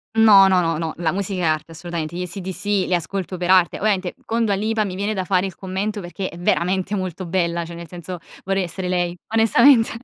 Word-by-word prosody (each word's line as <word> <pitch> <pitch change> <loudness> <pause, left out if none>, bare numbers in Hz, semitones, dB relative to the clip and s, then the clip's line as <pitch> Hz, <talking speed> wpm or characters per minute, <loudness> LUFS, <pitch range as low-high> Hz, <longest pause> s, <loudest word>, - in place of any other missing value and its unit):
No, 210 -3 +7
no, 185 -1 +4
no, 165 -2 0
no, 160 -1 -3
la 165 -1 0
musica 195 0 -3
è 170 - 0
arte, 155 +1 -1
assolutamente. 170 0 -5
Gli 180 - -3
ACDC 185 +1 -4 0.2
li 185 - -2
ascolto 185 +2 -2
per 180 0 -3
arte. 185 -2 +4
Ovviamente, 195 -3 0
con 230 0 0
Dua 205 - +1
Lipa 215 +2 0
mi 185 - -5
viene 200 +3 -2
da 185 - -1
fare 185 0 +1
il 190 - -9
commento, 200 +2 -3
perché 185 +2 -5
è 170 - -11
veramente 185 +3 0
molto 185 -1 -4
bella, 170 -1 -1
cioè 170 - -9
nel 170 0 -8
senso, 175 +1 -8 0.3
vorrei 195 0 0
essere 180 +1 -4
lei, 175 -1 -1 0.2
onestamente. 225 +2 +5
185 Hz, 220 wpm, -21 LUFS, 175-195 Hz, 0.3 s, No